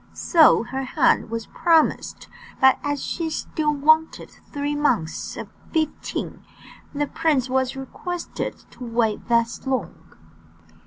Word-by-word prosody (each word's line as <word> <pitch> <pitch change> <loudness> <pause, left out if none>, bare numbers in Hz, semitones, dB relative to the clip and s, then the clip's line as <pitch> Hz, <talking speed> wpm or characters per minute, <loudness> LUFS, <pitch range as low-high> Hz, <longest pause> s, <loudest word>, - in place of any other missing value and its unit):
So 320 -8 +5
her 265 +3 -4
hand 255 - +2
was 230 0 -4
promised, 325 -2 +1 0.3
but 265 0 +5
as 290 -1 -2
she 330 -2 -3
still 310 -1 -1
wanted 315 +2 +2 0.2
three 290 0 -2
months 230 - -1
of - - -6 0.2
fifteen, 315 -2 -3 0.5
the 290 0 -1
prince 290 -5 0
was 260 0 0
requested 340 +6 -5 0.2
to - - -11
wait 230 -2 -1
thus 235 +2 +1
long. 255 -10 -1
280 Hz, 120 wpm, -23 LUFS, 250-315 Hz, 0.5 s, So